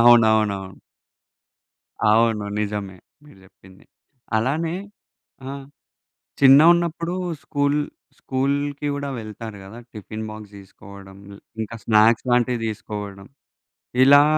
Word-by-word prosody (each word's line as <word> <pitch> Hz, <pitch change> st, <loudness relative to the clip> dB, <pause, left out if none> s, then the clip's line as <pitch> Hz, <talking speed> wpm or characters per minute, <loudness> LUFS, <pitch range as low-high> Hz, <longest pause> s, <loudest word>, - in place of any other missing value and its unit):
అవునవునవును. 110 Hz, -5 st, +4 dB, 1.4 s
అవును. 110 Hz, -1 st, +3 dB, 0.2 s
నిజమే 100 Hz, -2 st, -4 dB, 0.3 s
మీరు 145 Hz, -, -17 dB
చెప్పింది. 95 Hz, 0 st, -19 dB, 0.5 s
అలానే 155 Hz, +9 st, 0 dB, 0.7 s
ఆహ్, 140 Hz, 0 st, -7 dB, 0.8 s
చిన్నగా 140 Hz, +4 st, +8 dB
ఉన్నప్పుడు 170 Hz, 0 st, -2 dB, 0.3 s
స్కూల్, 145 Hz, -1 st, 0 dB, 0.4 s
స్కూల్‌కి 140 Hz, +2 st, -1 dB
కూడా 140 Hz, 0 st, -4 dB
వెళ్తారు 110 Hz, 0 st, -8 dB
కదా! 100 Hz, +4 st, -11 dB, 0.2 s
టిఫిన్ 110 Hz, +1 st, -7 dB
బాక్స్ 110 Hz, -1 st, -10 dB
తీసుకోవడం, 100 Hz, 0 st, -14 dB, 0.4 s
ఇంకా 115 Hz, +2 st, -5 dB
స్నాక్స్‌ 110 Hz, +2 st, +4 dB
లాంటివి 120 Hz, 0 st, +2 dB
తీసుకోవడం, 105 Hz, -2 st, -6 dB, 0.8 s
ఇలా 145 Hz, +2 st, +8 dB
110 Hz, 90 wpm, -22 LUFS, 105-140 Hz, 1.4 s, చిన్నగా